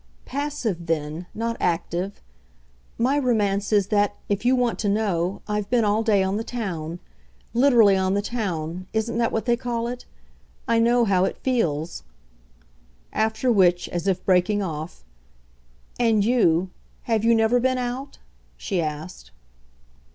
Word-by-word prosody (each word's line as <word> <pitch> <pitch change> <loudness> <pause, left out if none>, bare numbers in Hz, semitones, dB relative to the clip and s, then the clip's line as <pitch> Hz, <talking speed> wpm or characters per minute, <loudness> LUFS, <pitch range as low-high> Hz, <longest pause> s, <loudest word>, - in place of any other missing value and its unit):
"Passive 255 - -3
then 160 +2 -2
not 230 +1 -2
active. 175 +2 -2 0.7
My 265 +5 +2
romance 205 -6 0
is 205 -2 +3
that, 205 -1 +2
if 205 +1 -1
you 255 +1 +4
want 245 -2 0
to 205 - 0
know, 200 -3 -1
I've 210 -1 -2
been 235 -3 +2
all 210 +1 +2
day 210 -4 +3
on 190 +2 -1
the 225 - -2
town. 175 -9 -4 0.6
Literally 235 -5 +5
on 190 0 +1
the 200 - +1
town 185 -6 -3
isn't 225 +1 -1
that 230 - +1
what 225 - -2
they 240 -1 +3
call 235 -1 -3
it? 245 +1 -6 0.6
I 230 0 +3
know 235 +1 +4
how 190 -3 +3
it - - -3
feels." 170 - -1 1.1
After 220 +3 +1
which, 180 -5 +3
as 175 +1 -3
if 190 -2 0
breaking 195 +3 +2
off, 160 - -6 1.0
"And 225 -4 +3
you, 185 -7 +2 0.3
have 225 -2 0
you 230 0 +4
never 225 +2 +3
been 255 +1 +1
out?" 250 +3 -4 0.4
she 190 -4 -2
asked. 155 +3 -6
210 Hz, 150 wpm, -24 LUFS, 180-235 Hz, 1.1 s, Literally